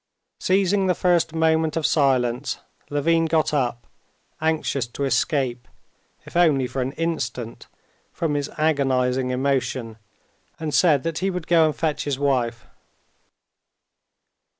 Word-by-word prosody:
Seizing 190 Hz, +1 st, +2 dB
the 180 Hz, -, +2 dB
first 175 Hz, -2 st, +2 dB
moment 160 Hz, 0 st, +2 dB
of 160 Hz, -, -1 dB
silence, 130 Hz, -2 st, +1 dB, 0.3 s
Levin 165 Hz, +3 st, +2 dB
got 160 Hz, -1 st, +1 dB
up, 120 Hz, -4 st, -1 dB, 0.6 s
anxious 155 Hz, -5 st, 0 dB
to 130 Hz, +4 st, -5 dB
escape, 130 Hz, -2 st, 0 dB, 0.6 s
if -, -, -13 dB
only 155 Hz, -7 st, +4 dB
for 130 Hz, +2 st, -3 dB
an 130 Hz, +2 st, -2 dB
instant, 155 Hz, -8 st, -4 dB, 0.4 s
from 160 Hz, -3 st, -2 dB
his 145 Hz, -1 st, -2 dB
agonizing 130 Hz, -4 st, +1 dB
emotion, 125 Hz, -3 st, -1 dB, 0.6 s
and 155 Hz, -2 st, -4 dB
said 145 Hz, +1 st, +4 dB
that 165 Hz, -1 st, -2 dB
he 190 Hz, +2 st, 0 dB
would 180 Hz, -3 st, -4 dB
go 165 Hz, -2 st, +4 dB
and 155 Hz, -, -2 dB
fetch 155 Hz, -2 st, -1 dB
his 140 Hz, -2 st, -1 dB
wife. 125 Hz, -5 st, 0 dB
145 Hz, 125 wpm, -23 LUFS, 130-160 Hz, 0.6 s, only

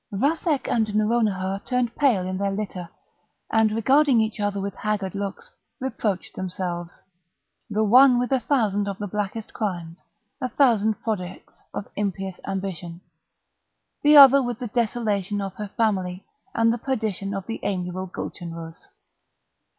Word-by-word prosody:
Vathek 285 Hz, -, 0 dB
and 215 Hz, -3 st, 0 dB
Nouronihar 210 Hz, -3 st, +1 dB
turned 250 Hz, -2 st, -1 dB
pale 240 Hz, -11 st, +2 dB
in 185 Hz, 0 st, -3 dB
their 200 Hz, 0 st, 0 dB
litter, 195 Hz, -3 st, -4 dB, 0.6 s
and, 220 Hz, -1 st, +3 dB
regarding 265 Hz, +4 st, +4 dB
each 220 Hz, 0 st, -1 dB
other 205 Hz, -1 st, -1 dB
with 200 Hz, 0 st, -3 dB
haggard 205 Hz, -3 st, -2 dB
looks, 200 Hz, -, -5 dB, 0.3 s
reproached 215 Hz, -7 st, -2 dB
themselves—the 180 Hz, +3 st, -6 dB
one 250 Hz, +4 st, +7 dB
with 250 Hz, +2 st, -1 dB
a 265 Hz, -, +3 dB
thousand 215 Hz, -6 st, +1 dB
of 200 Hz, -1 st, -3 dB
the 205 Hz, -, -4 dB
blackest 210 Hz, +2 st, -4 dB
crimes, 175 Hz, -5 st, -4 dB, 0.4 s
a 255 Hz, -, -1 dB
thousand 220 Hz, -5 st, +3 dB
projects 185 Hz, -5 st, -5 dB
of 200 Hz, -, -5 dB
impious 195 Hz, -2 st, -3 dB
ambition—the 190 Hz, -, -3 dB
other 275 Hz, 0 st, +10 dB
with 245 Hz, -3 st, -3 dB
the 245 Hz, -2 st, -5 dB
desolation 210 Hz, -4 st, -1 dB
of 195 Hz, -2 st, -4 dB
her 210 Hz, -1 st, -5 dB
family, 190 Hz, -5 st, 0 dB, 0.3 s
and 230 Hz, 0 st, +3 dB
the 240 Hz, -, -4 dB
perdition 215 Hz, -6 st, -2 dB
of 195 Hz, -1 st, -4 dB
the 225 Hz, -, -5 dB
amiable 185 Hz, -1 st, -3 dB
Gulchenrouz. 165 Hz, -2 st, -7 dB
205 Hz, 135 wpm, -24 LUFS, 190-235 Hz, 0.6 s, other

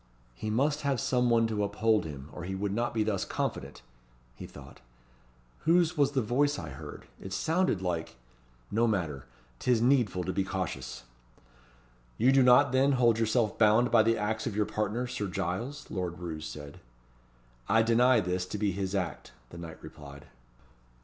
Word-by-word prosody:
"He 110 Hz, -, -5 dB
must 145 Hz, +7 st, +1 dB
have 140 Hz, -3 st, 0 dB
some 125 Hz, -1 st, +1 dB
one 115 Hz, -1 st, +4 dB
to 110 Hz, -2 st, -1 dB
uphold 105 Hz, -1 st, +1 dB
him, 70 Hz, -2 st, -8 dB
or -, -, -7 dB
he 95 Hz, +2 st, -4 dB
would 100 Hz, +1 st, -2 dB
not 120 Hz, +4 st, -1 dB
be 110 Hz, -2 st, 0 dB
thus 105 Hz, -3 st, -1 dB
confident," -, -, -4 dB, 0.5 s
he -, -, -9 dB
thought. -, -, -13 dB, 0.8 s
"Whose 170 Hz, +1 st, +3 dB
was 145 Hz, -2 st, +2 dB
the 130 Hz, -3 st, +1 dB
voice 145 Hz, +6 st, +1 dB
I 80 Hz, -, -6 dB
heard? 65 Hz, -, -9 dB, 0.2 s
It 95 Hz, -, -8 dB
sounded 160 Hz, -, 0 dB
like 85 Hz, -6 st, -3 dB, 0.6 s
No 115 Hz, +2 st, +2 dB
matter! 80 Hz, -, -2 dB, 0.3 s
'Tis 125 Hz, -2 st, +2 dB
needful 120 Hz, -7 st, +2 dB
to 95 Hz, -, -3 dB
be 95 Hz, -, 0 dB
cautious." 90 Hz, -11 st, -4 dB, 1.1 s
"You 125 Hz, +4 st, +4 dB
do 135 Hz, 0 st, +5 dB
not, 125 Hz, +2 st, +6 dB
then, 135 Hz, +2 st, +3 dB
hold 120 Hz, -3 st, +3 dB
yourself 110 Hz, -1 st, +1 dB
bound 110 Hz, +3 st, +4 dB
by 115 Hz, -, +6 dB
the 115 Hz, +1 st, +2 dB
acts 110 Hz, +1 st, -2 dB
of 100 Hz, -, -3 dB
your 105 Hz, 0 st, +2 dB
partner, 105 Hz, +4 st, -2 dB
Sir 125 Hz, -5 st, -3 dB
Giles?" 95 Hz, +10 st, -4 dB
Lord 90 Hz, -3 st, -3 dB
Roos 80 Hz, -3 st, -6 dB
said. 75 Hz, -1 st, -9 dB, 0.9 s
"I 110 Hz, +2 st, +5 dB
deny 120 Hz, +1 st, +4 dB
this 90 Hz, 0 st, -2 dB
to 105 Hz, -, -4 dB
be 105 Hz, -1 st, 0 dB
his 95 Hz, +1 st, -3 dB
act," 90 Hz, -6 st, -4 dB, 0.2 s
the 85 Hz, -, -9 dB
knight 85 Hz, -1 st, -8 dB
replied. 70 Hz, -1 st, -11 dB
110 Hz, 175 wpm, -29 LUFS, 90-125 Hz, 1.1 s, not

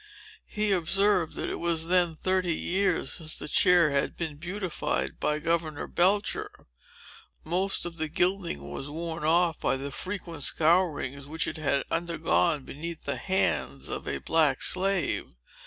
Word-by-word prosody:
He 210 Hz, -1 st, 0 dB
observed, 190 Hz, -1 st, +2 dB
that -, -, -3 dB
it -, -, -4 dB
was 165 Hz, -1 st, 0 dB
then 175 Hz, -2 st, +3 dB
thirty 185 Hz, 0 st, 0 dB
years 185 Hz, -5 st, 0 dB
since 155 Hz, -1 st, -1 dB
the -, -, -5 dB
chair 175 Hz, -1 st, +5 dB
had 140 Hz, 0 st, 0 dB
been 160 Hz, -4 st, -4 dB
beautified 165 Hz, -, -3 dB
by 150 Hz, -, +1 dB
Governor 160 Hz, -1 st, -1 dB
Belcher. 200 Hz, +4 st, +1 dB, 0.9 s
Most 185 Hz, +5 st, 0 dB
of 170 Hz, -1 st, -6 dB
the 160 Hz, -1 st, -1 dB
gilding 170 Hz, -, -1 dB
was 135 Hz, -, -5 dB
worn 165 Hz, +1 st, -5 dB
off 165 Hz, +1 st, +3 dB
by -, -, +1 dB
the 140 Hz, +1 st, -5 dB
frequent 180 Hz, -2 st, -5 dB
scourings 155 Hz, -4 st, +1 dB
which 160 Hz, +2 st, -1 dB
it -, -, -4 dB
had 140 Hz, -3 st, 0 dB
undergone, 165 Hz, -2 st, +1 dB
beneath 165 Hz, +5 st, -7 dB
the -, -, -2 dB
hands 70 Hz, -, -1 dB
of -, -, -5 dB
a 70 Hz, -, -1 dB
black 150 Hz, -, +2 dB
slave. 190 Hz, -, +1 dB
165 Hz, 150 wpm, -28 LUFS, 150-180 Hz, 0.9 s, chair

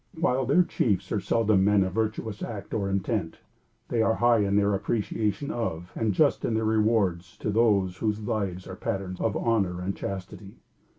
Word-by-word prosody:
While 130 Hz, -5 st, +1 dB
their 175 Hz, +7 st, +5 dB
chiefs 105 Hz, -, -1 dB
are 105 Hz, -, +1 dB
seldom 110 Hz, -1 st, +2 dB
men 100 Hz, 0 st, +4 dB
of 95 Hz, -1 st, -3 dB
virtuous 110 Hz, -1 st, -2 dB
act 105 Hz, -4 st, -6 dB
or 100 Hz, -3 st, -1 dB
intent, 100 Hz, -3 st, -2 dB, 0.5 s
they 115 Hz, -, +1 dB
are 115 Hz, 0 st, +2 dB
high 120 Hz, -1 st, +4 dB
in 100 Hz, -1 st, +1 dB
their 100 Hz, 0 st, +3 dB
appreciation 105 Hz, +5 st, -1 dB
of, 90 Hz, -, -4 dB
and 110 Hz, -2 st, 0 dB
just 145 Hz, +8 st, +2 dB
in 115 Hz, -, 0 dB
their 110 Hz, 0 st, 0 dB
rewards 105 Hz, -5 st, +1 dB
to 105 Hz, -, -2 dB
those 100 Hz, -5 st, +2 dB
whose 105 Hz, 0 st, -1 dB
lives 100 Hz, -4 st, -3 dB
are 95 Hz, -, -7 dB
patterns 95 Hz, -1 st, -4 dB
of 110 Hz, -, 0 dB
honor 100 Hz, -6 st, 0 dB
and 95 Hz, +2 st, -3 dB
chastity. 95 Hz, +1 st, -7 dB
105 Hz, 180 wpm, -27 LUFS, 95-115 Hz, 0.5 s, their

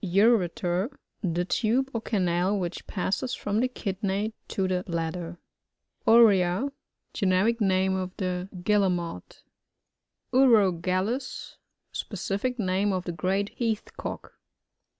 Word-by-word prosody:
Ureter. 195 Hz, 0 st, +2 dB, 0.2 s
— -, -, -51 dB
The 175 Hz, -2 st, 0 dB
tube 245 Hz, +7 st, +1 dB
or 230 Hz, -, -2 dB
canal, 185 Hz, -2 st, +1 dB
which 180 Hz, -2 st, -4 dB
passes 205 Hz, +6 st, -1 dB
from 205 Hz, +1 st, -1 dB
the 255 Hz, +2 st, +2 dB
liidney 200 Hz, -1 st, -2 dB
to 190 Hz, -1 st, -1 dB
the 185 Hz, -1 st, 0 dB
blad 165 Hz, -2 st, -1 dB
der. 175 Hz, -1 st, -6 dB, 0.7 s
Uria.— 220 Hz, +1 st, +5 dB, 0.4 s
Generic 205 Hz, +4 st, +2 dB
name 190 Hz, -1 st, +2 dB
of 185 Hz, -1 st, -3 dB
the 185 Hz, -1 st, -2 dB
Guille* 205 Hz, -1 st, +3 dB
mots. 170 Hz, -, -5 dB, 0.9 s
UROGALLUV—Specific 205 Hz, 0 st, 0 dB
name 195 Hz, -1 st, +1 dB
of 185 Hz, -2 st, -1 dB
the 175 Hz, -, -3 dB
great 190 Hz, +5 st, -1 dB
Heath 225 Hz, -3 st, -3 dB
Cock. -, -, -6 dB
190 Hz, 115 wpm, -27 LUFS, 180-220 Hz, 0.9 s, Uria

